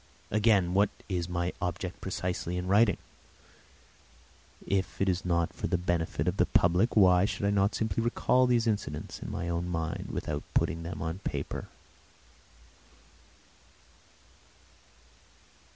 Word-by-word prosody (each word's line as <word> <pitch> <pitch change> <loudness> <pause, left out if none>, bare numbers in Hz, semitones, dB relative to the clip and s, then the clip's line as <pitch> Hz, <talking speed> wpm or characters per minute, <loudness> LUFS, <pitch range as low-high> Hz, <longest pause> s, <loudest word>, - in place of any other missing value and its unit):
Again, 105 -4 +3
what 100 +2 +4 0.2
is 90 -3 -2
my 85 0 -1
object 90 +2 -3
precisely 90 -1 -3
in 90 - -3
writing? 100 +3 +4 1.7
If 95 -1 -1
it 95 - +1
is 95 -1 0
not 85 -2 0
for - - -3
the 90 - +1
benefit 85 -2 -1
of - - 0
the - - +3
public 90 +7 +3
why 90 -2 +6
should 100 - -2
I 100 - +3
not 100 0 +2
simply 110 -1 -1
recall 125 +2 +2
these 120 -2 +2
incidents 110 -3 -2
in - - -5
my 85 - -4
own 85 +1 -1
mind 80 -1 -3
without 75 -1 -3
putting 85 - +1
them 85 +2 -5
on 80 +3 -3
paper? - - -4
90 Hz, 135 wpm, -29 LUFS, 85-100 Hz, 1.7 s, why